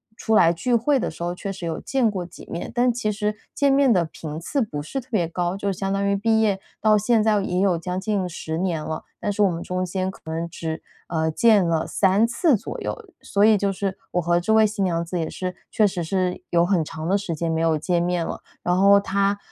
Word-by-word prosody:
出 220 -1 0
来 165 -5 +6
聚 245 +8 0
会 260 +4 +2
的 - - -1
时 - - -8
候， 175 0 -1
确 195 +2 -5
实 185 -3 -7
有 165 - -3
见 255 -5 +1
过 185 -3 -4
几 175 - -13
面， 170 - -5
但 245 +1 +3
其 225 -3 -1
实 210 0 -2 0.2
见 280 -1 +3
面 275 -2 +4
的 180 -6 +3
频 155 -1 -7
次 275 - -1
不 150 -11 -3
是 270 - -4
特 250 - -22
别 180 -8 +1
高， 175 +1 -2
就 200 0 -1
相 195 +1 -3
当 200 0 0
于 200 - +2
毕 220 +2 +2
业 200 -3 +1 0.2
到 215 0 +5
现 215 +1 +2
在 210 -2 +3
也 180 -2 -1
有 190 -3 +3
将 180 +2 -3
近 195 -2 -1
10 160 -2 -5
年 170 -3 -1
了， 155 0 -4 0.2
但 205 - -1
是 205 - -1
我 200 - +5
们 170 -1 -4
中 185 +1 -2
间 185 +1 -2
可 - - -11
能 165 +1 -3 0.4
只， - - -27 0.2
呃， 160 -1 0
见 210 +2 +4
了 165 -1 0
3 195 +3 +3
次 240 +3 +2
左 - - -7
右。 - - -3 0.3
所 200 - 0
以 220 -1 +6
就 200 0 0
是 195 0 -3
我 180 - +1
和 170 +1 +2
这 220 +5 0
位 220 0 +6
新 205 -2 -2
娘 170 -2 0
子 175 +1 -3
也 160 - -2
是， 185 -1 -4 0.2
确 215 - +3
实 185 -3 -2
是 180 +1 -1
有 170 0 +4
很 180 -2 +2
长 160 +1 -6
的 195 +2 +3
时 185 -5 -4
间 165 +1 -2
没 160 - 0
有 165 -1 +2
见 170 +3 0
面 175 -1 0
了， - - -5 0.2
然 175 - +1
后 200 +1 +7
她 200 0 0
190 Hz, 265 characters per minute, -23 LUFS, 170-210 Hz, 0.4 s, 后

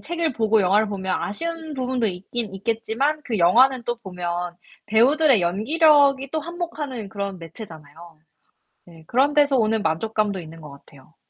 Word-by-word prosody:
책을 335 -3 -2
보고 220 -1 +2
영화를 205 +3 +2
보면 190 -2 -3
아쉬운 325 +7 -4
부분도 255 -3 -1
있긴 195 +3 -5
있겠지만 225 +8 -1
그 225 -3 -2
영화는 245 +9 +4
또 240 0 -2
보면 175 -4 -5 0.3
배우들의 255 +4 +4
연기력이 275 - +3
또 315 - -2
한몫하는 300 - -5
그런 200 -2 -5
매체잖아요. 165 -2 -12 0.7
네, 165 -2 -16
그런 270 - +2
데서 290 -2 +4
오는 220 -2 +1
만족감도 205 +4 -1
있는 165 0 -12
것 150 -2 -11
같아요. 140 +1 -18
220 Hz, 345 characters per minute, -22 LUFS, 180-275 Hz, 0.7 s, 영화는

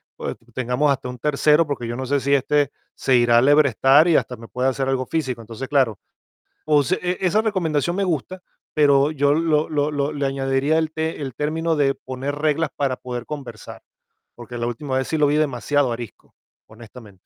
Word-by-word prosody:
pues - - -5 0.2
tengamos 130 +4 +1
hasta 125 -2 -2
un 125 - -7
tercero, 150 +3 +3
porque 125 -5 -4
yo 120 - -4
no 130 - -4
sé 140 +2 +1
si 140 +2 0
este 145 +1 +2 0.2
se 130 - +1
irá 120 -1 +4
alebrestar 140 +2 +5
y 165 - +4
hasta 125 - -2
me 115 - -12
puede 125 +3 0
hacer 135 0 -2
algo 130 -1 0
físico. 130 -7 -2
Entonces, 115 +4 -7
claro, 130 -7 +1 0.7
o 150 -2 +3
se 185 +7 -1
e 180 0 -1
esa 190 +4 +2
recomendación 175 -5 -1
me 200 - 0
gusta, 180 +2 -3 0.3
pero 145 -1 +4
yo 145 -1 +2
lo 155 -1 +1
lo 150 0 0
lo 145 0 -1
le 140 -2 -2
añadiría 135 +3 0
el 160 -1 0
te 160 0 -3
el 135 -3 -5
término 160 +2 -1
de 135 -2 +2
poner 130 +2 -5
reglas 155 +1 0
para 135 -3 0
poder 125 -1 -6
conversar, 130 -8 -8 0.5
porque 120 0 -9
la 120 - -2
última 130 +3 -3
vez 130 - -3
sí 160 - -1
lo 150 - +4
vi 145 - +2
demasiado 145 -2 +1
arisco, 115 -4 -9 0.3
honestamente. 110 -2 -14
140 Hz, 200 wpm, -22 LUFS, 125-150 Hz, 0.7 s, alebrestar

